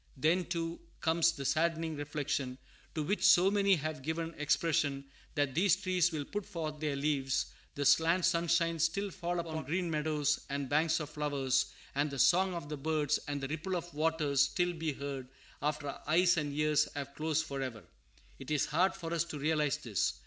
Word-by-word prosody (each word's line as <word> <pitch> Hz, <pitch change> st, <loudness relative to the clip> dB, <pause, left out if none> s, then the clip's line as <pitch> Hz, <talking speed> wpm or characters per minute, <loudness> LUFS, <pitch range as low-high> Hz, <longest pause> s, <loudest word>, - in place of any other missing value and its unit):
Then, 165 Hz, +6 st, +2 dB
too, 170 Hz, -1 st, -3 dB, 0.2 s
comes 165 Hz, 0 st, +3 dB
the 140 Hz, -4 st, -7 dB
saddening 165 Hz, +1 st, +1 dB
reflection, 145 Hz, -3 st, -3 dB, 0.4 s
to 155 Hz, -, -1 dB
which 200 Hz, +8 st, -1 dB
so 185 Hz, +3 st, +6 dB
many 200 Hz, -1 st, +4 dB
have 155 Hz, -2 st, -4 dB
given 165 Hz, +3 st, -3 dB
expression, 150 Hz, -2 st, +1 dB, 0.3 s
that 145 Hz, -3 st, +1 dB
these 185 Hz, +5 st, +4 dB
trees 185 Hz, -3 st, +1 dB
will 150 Hz, -3 st, -3 dB
put 205 Hz, +6 st, -4 dB
forth 160 Hz, -6 st, -5 dB
their 150 Hz, -2 st, -1 dB
leaves, 140 Hz, -2 st, 0 dB, 0.2 s
the 145 Hz, -, -2 dB
slant 165 Hz, +5 st, +4 dB
sunshine 165 Hz, 0 st, +2 dB
still 195 Hz, +5 st, 0 dB
fall 175 Hz, 0 st, -3 dB
upon 160 Hz, -2 st, -4 dB
green 170 Hz, +4 st, -1 dB
meadows 150 Hz, -1 st, +1 dB
and 140 Hz, 0 st, -2 dB
banks 155 Hz, +4 st, +2 dB
of 150 Hz, -1 st, -6 dB
flowers, 140 Hz, -3 st, 0 dB, 0.3 s
and 145 Hz, +2 st, +1 dB
the 140 Hz, -, -6 dB
song 185 Hz, +5 st, +4 dB
of 170 Hz, -4 st, -5 dB
the 150 Hz, 0 st, -5 dB
birds 150 Hz, 0 st, 0 dB
and 145 Hz, -1 st, -3 dB
the 135 Hz, -, -2 dB
ripple 160 Hz, +6 st, -3 dB
of 175 Hz, 0 st, -5 dB
waters 150 Hz, -2 st, +1 dB
still 175 Hz, +5 st, +2 dB
be 160 Hz, -2 st, -2 dB
heard 135 Hz, -2 st, -5 dB, 0.3 s
after 150 Hz, 0 st, -1 dB
our -, -, -7 dB
eyes 175 Hz, +3 st, +4 dB
and 150 Hz, -3 st, -1 dB
ears 150 Hz, 0 st, +3 dB
have 140 Hz, -1 st, -5 dB
closed 160 Hz, +1 st, 0 dB
forever. 130 Hz, -7 st, -5 dB, 0.6 s
It 135 Hz, -, -9 dB
is 150 Hz, -2 st, +2 dB
hard 180 Hz, +6 st, +2 dB
for 165 Hz, -1 st, -5 dB
us 170 Hz, -1 st, +2 dB
to 160 Hz, -3 st, -6 dB
realize 150 Hz, -1 st, +1 dB
this. 115 Hz, -10 st, -1 dB
155 Hz, 185 wpm, -32 LUFS, 145-170 Hz, 0.6 s, so